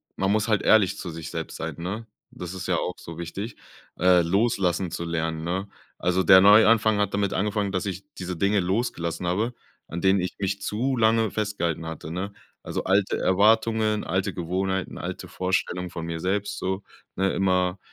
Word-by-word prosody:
man 95 Hz, +1 st, 0 dB
muss 105 Hz, +1 st, +1 dB
halt 105 Hz, -3 st, +2 dB
ehrlich 100 Hz, -4 st, +4 dB
zu 90 Hz, -, -5 dB
sich 80 Hz, -2 st, -7 dB
selbst -, -, -5 dB
sein, 80 Hz, -1 st, -4 dB
ne? 105 Hz, +6 st, -4 dB, 0.2 s
Das 90 Hz, 0 st, -7 dB
ist 95 Hz, -1 st, -6 dB
ja 90 Hz, -, +2 dB
auch 90 Hz, -, -2 dB
so 85 Hz, 0 st, -9 dB
wichtig, 100 Hz, +6 st, -5 dB, 0.4 s
äh, 90 Hz, 0 st, +5 dB
loslassen 95 Hz, -1 st, +1 dB
zu 85 Hz, +1 st, -4 dB
lernen, 80 Hz, -1 st, -2 dB
ne? 95 Hz, +4 st, -2 dB, 0.3 s
Also 90 Hz, +1 st, +1 dB
der 95 Hz, -1 st, +8 dB
Neuanfang 110 Hz, +1 st, +6 dB
hat 100 Hz, -1 st, 0 dB
damit 100 Hz, -1 st, 0 dB
angefangen, 100 Hz, 0 st, 0 dB
dass 95 Hz, 0 st, -2 dB
ich 95 Hz, 0 st, -4 dB, 0.2 s
diese 90 Hz, -1 st, -4 dB
Dinge 100 Hz, +2 st, +2 dB
losgelassen 90 Hz, -3 st, -1 dB
habe, 105 Hz, +8 st, 0 dB, 0.3 s
an 85 Hz, -, -5 dB
denen 95 Hz, 0 st, +4 dB
ich 90 Hz, 0 st, -4 dB
mich 100 Hz, 0 st, -2 dB
zu 130 Hz, +6 st, -1 dB
lange 110 Hz, -1 st, +3 dB
festgehalten 100 Hz, -7 st, -2 dB
hatte, 80 Hz, 0 st, -7 dB
ne? 95 Hz, +4 st, -3 dB, 0.3 s
Also -, -, -4 dB
alte 95 Hz, +1 st, +2 dB
Erwartungen, 110 Hz, +2 st, +3 dB
alte 95 Hz, +3 st, -1 dB
Gewohnheiten, 95 Hz, +2 st, -2 dB
alte -, -, -5 dB
Vorstellungen 90 Hz, -1 st, -1 dB
von 85 Hz, -1 st, -6 dB
mir 85 Hz, 0 st, -4 dB
selbst 100 Hz, +4 st, -1 dB
so, 95 Hz, +1 st, -2 dB, 0.3 s
ne? 95 Hz, +1 st, +1 dB
Immer, 90 Hz, -1 st, +1 dB
95 Hz, 180 wpm, -25 LUFS, 90-105 Hz, 0.4 s, der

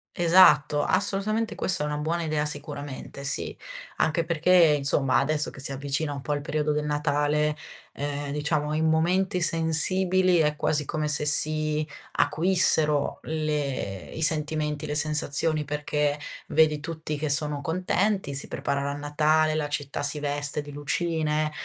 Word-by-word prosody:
Esatto, 165 Hz, -4 st, +5 dB
assolutamente 210 Hz, +3 st, 0 dB
questa 185 Hz, -6 st, 0 dB
è -, -, -1 dB
una 150 Hz, 0 st, -3 dB
buona 165 Hz, +3 st, -2 dB
idea 155 Hz, -2 st, -1 dB
sicuramente, 145 Hz, -2 st, -5 dB
sì. 140 Hz, -, +1 dB, 0.4 s
Anche 165 Hz, +1 st, 0 dB
perché, 170 Hz, +2 st, 0 dB, 0.2 s
insomma, 140 Hz, -1 st, +2 dB
adesso 150 Hz, +2 st, -1 dB
che -, -, -13 dB
si 140 Hz, -, -1 dB
avvicina 140 Hz, +3 st, -1 dB
un 140 Hz, -, -7 dB
po' 150 Hz, -, -5 dB
al 145 Hz, 0 st, -1 dB
periodo 150 Hz, +1 st, -2 dB
del 150 Hz, 0 st, -1 dB
Natale, 150 Hz, 0 st, 0 dB, 0.4 s
ehm, 145 Hz, 0 st, -4 dB
diciamo 150 Hz, 0 st, -1 dB
in 160 Hz, +1 st, +1 dB
momenti 180 Hz, +4 st, +1 dB
sensibili, 180 Hz, +2 st, +2 dB
è 150 Hz, -1 st, +1 dB
quasi 150 Hz, 0 st, +1 dB
come 155 Hz, +1 st, -3 dB
se 150 Hz, 0 st, +2 dB
si 155 Hz, 0 st, +1 dB, 0.3 s
acuissero 160 Hz, -4 st, +2 dB
le 145 Hz, -, -3 dB
i -, -, -7 dB
sentimenti, 155 Hz, -1 st, -1 dB
le 150 Hz, -, -3 dB
sensazioni 150 Hz, +1 st, +1 dB
perché 150 Hz, 0 st, -2 dB, 0.3 s
vedi 155 Hz, -1 st, +2 dB
tutti 160 Hz, 0 st, -5 dB
che 150 Hz, 0 st, -3 dB
sono 150 Hz, 0 st, 0 dB
contenti, 185 Hz, +2 st, -1 dB
si 140 Hz, -, +1 dB
preparano 140 Hz, 0 st, -3 dB
a -, -, -3 dB
Natale, 150 Hz, +2 st, +1 dB
la 155 Hz, -1 st, -2 dB
città 145 Hz, -1 st, -3 dB
si 145 Hz, +1 st, +2 dB
veste 145 Hz, 0 st, -1 dB
di 145 Hz, 0 st, -11 dB
lucine, 155 Hz, +1 st, -1 dB
150 Hz, 150 wpm, -25 LUFS, 145-160 Hz, 0.4 s, Esatto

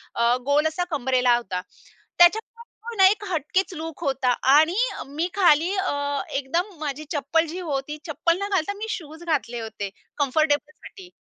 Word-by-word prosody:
अ, 235 Hz, +1 st, +3 dB
गोल 295 Hz, +2 st, +3 dB
असा 315 Hz, +3 st, -2 dB
कंबरेला 250 Hz, -2 st, +3 dB
होता. 185 Hz, -6 st, -3 dB, 0.6 s
त्याच्यामुळे 430 Hz, +7 st, +5 dB, 0.3 s
तो 470 Hz, -, -5 dB
ना 385 Hz, -, +7 dB
एक 415 Hz, +1 st, -1 dB
हटकेच 370 Hz, +2 st, -1 dB
लूक 325 Hz, +1 st, -7 dB
होता 265 Hz, -3 st, +1 dB, 0.2 s
आणि 315 Hz, +4 st, +5 dB, 0.2 s
अ, -, -, -4 dB
मी 310 Hz, +5 st, -2 dB
खाली 345 Hz, -2 st, +4 dB
अ, 285 Hz, -6 st, -1 dB
एकदम 330 Hz, +8 st, 0 dB
माझी 300 Hz, 0 st, -4 dB
चप्पल 315 Hz, +2 st, +1 dB
जी 350 Hz, +4 st, -6 dB
होती, 295 Hz, -3 st, -3 dB
चप्पल 335 Hz, +3 st, +1 dB
न 400 Hz, -, -1 dB
घालता 385 Hz, 0 st, 0 dB
मी 440 Hz, +2 st, -5 dB
शूज 320 Hz, -2 st, -6 dB
घातले 270 Hz, -8 st, -1 dB
होते 220 Hz, -3 st, -5 dB, 0.3 s
कम्फर्टेबलसाठी. 305 Hz, +6 st, -1 dB
310 Hz, 160 wpm, -24 LUFS, 275-350 Hz, 0.6 s, ना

